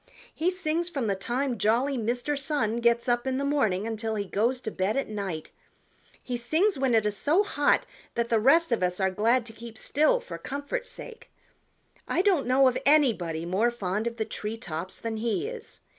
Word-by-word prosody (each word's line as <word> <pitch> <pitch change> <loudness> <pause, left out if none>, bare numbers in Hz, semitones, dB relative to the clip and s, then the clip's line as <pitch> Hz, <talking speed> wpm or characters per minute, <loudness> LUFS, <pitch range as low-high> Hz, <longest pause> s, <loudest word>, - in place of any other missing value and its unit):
He 335 +3 +1
sings 345 -2 -1
from 280 -8 -2
the 200 - +1
time 240 +5 -2
jolly 240 +7 +2
Mr. 245 +5 -1
Sun 275 -6 -1
gets 235 0 +2
up 240 +1 +1
in 260 0 0
the 280 - -1
morning 220 -9 +1
until 225 0 -2
he 205 -1 -2
goes 230 +7 0
to 220 - -4
bed 195 +6 -1
at 275 - 0
night. 195 -7 -5 0.7
He 250 - -3
sings 320 - +1
when 265 -3 +1
it 220 -1 +3
is 210 -1 0
so 315 - +3
hot 290 -8 +2 0.3
that 235 0 0
the 230 - +3
rest 280 +7 +4
of 235 - +1
us 180 +1 0
are 190 -1 +2
glad 225 +5 +2
to 225 - -9
keep 230 0 -10
still 310 - +2
for - - -8
comfort's 285 - -4
sake. 470 -1 -10 0.8
I 360 - +1
don't 365 -11 +2
know 260 +1 +5
of 255 0 +1
anybody 215 - +3
more 195 +7 +2
fond 210 -1 -2
of 235 0 -4
the 220 - -1
tree 215 +2 -5
tops 180 -3 -5
than 225 -1 -4
he 230 - -1
is. 475 -1 -8
235 Hz, 205 wpm, -27 LUFS, 215-285 Hz, 0.8 s, know